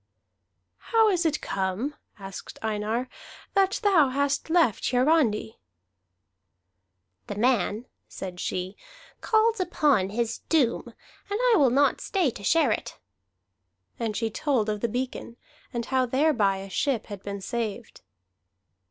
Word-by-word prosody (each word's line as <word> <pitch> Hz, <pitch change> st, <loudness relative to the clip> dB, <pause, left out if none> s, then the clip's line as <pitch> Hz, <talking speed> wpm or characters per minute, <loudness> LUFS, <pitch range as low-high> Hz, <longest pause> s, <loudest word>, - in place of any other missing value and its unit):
"How 450 Hz, -2 st, +5 dB
is 350 Hz, -4 st, +2 dB
it 305 Hz, -1 st, -1 dB
come," 195 Hz, +9 st, -2 dB, 0.2 s
asked 195 Hz, -1 st, -9 dB
Einar, 220 Hz, +3 st, -1 dB, 0.5 s
"that 390 Hz, 0 st, +2 dB
thou 350 Hz, -9 st, +5 dB
hast 280 Hz, +3 st, -1 dB
left 320 Hz, -, +3 dB
Hiarandi?" 250 Hz, -5 st, +2 dB, 1.7 s
"The 205 Hz, -, -5 dB
man," 230 Hz, 0 st, +1 dB, 0.2 s
said 180 Hz, -2 st, -7 dB
she, 185 Hz, +2 st, -3 dB, 0.5 s
"calls 445 Hz, 0 st, +2 dB
upon 295 Hz, -, +2 dB
his 230 Hz, +2 st, -2 dB
doom, 285 Hz, -8 st, +2 dB, 0.4 s
and 410 Hz, +2 st, -1 dB
I -, -, +5 dB
will 275 Hz, -6 st, +5 dB
not 280 Hz, +4 st, +2 dB
stay 360 Hz, -9 st, +1 dB
to 200 Hz, -, -11 dB
share 300 Hz, -, +3 dB
it." -, -, -3 dB, 1.0 s
And 225 Hz, -3 st, -2 dB
she 225 Hz, -1 st, -1 dB
told 245 Hz, -4 st, 0 dB
of 210 Hz, -1 st, -2 dB
the 235 Hz, -, 0 dB
beacon, 245 Hz, 0 st, -4 dB, 0.3 s
and 235 Hz, -1 st, -3 dB
how 260 Hz, -1 st, +1 dB
thereby 245 Hz, -7 st, +2 dB
a 195 Hz, +1 st, -8 dB
ship 260 Hz, -3 st, 0 dB
had 205 Hz, -3 st, -8 dB
been 200 Hz, 0 st, -5 dB
saved. 230 Hz, +1 st, -5 dB
245 Hz, 130 wpm, -26 LUFS, 210-305 Hz, 1.7 s, How